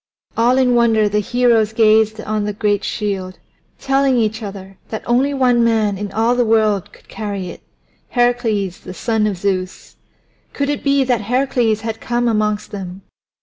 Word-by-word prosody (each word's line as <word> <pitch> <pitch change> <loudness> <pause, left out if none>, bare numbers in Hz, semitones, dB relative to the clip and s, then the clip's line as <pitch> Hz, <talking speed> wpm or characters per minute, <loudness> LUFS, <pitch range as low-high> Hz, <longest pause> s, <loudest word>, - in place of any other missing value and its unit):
All 240 +3 +3
in 255 -2 +3
wonder 225 -3 +3
the 210 +1 0
heroes 225 0 +2
gazed 220 -1 +3
on 215 -1 -2
the 210 - -2
great 205 0 0
shield, 195 -4 -3 0.4
telling 270 -1 +1
each 220 -1 0
other 195 -2 -9
that 220 - -5
only 255 +4 +2
one 250 -3 +2
man 220 -3 +2
in 205 +1 -5
all 225 +3 +1
the 245 - +2
world 215 -4 +1
could - - -20
carry 200 -4 -5
it - - -10 0.5
Heracles 235 -6 0
the 185 - -10
son 220 -1 0
of 200 -3 -2
Zeus. 185 -1 -3 0.6
Could 280 0 -1
it 290 - -2
be 280 -1 +3
that 245 -4 0
Heracles 240 -1 0
had 225 0 -5
come 240 0 -1
amongst 215 -2 -1
them? 190 -2 -7
220 Hz, 170 wpm, -18 LUFS, 205-240 Hz, 0.6 s, All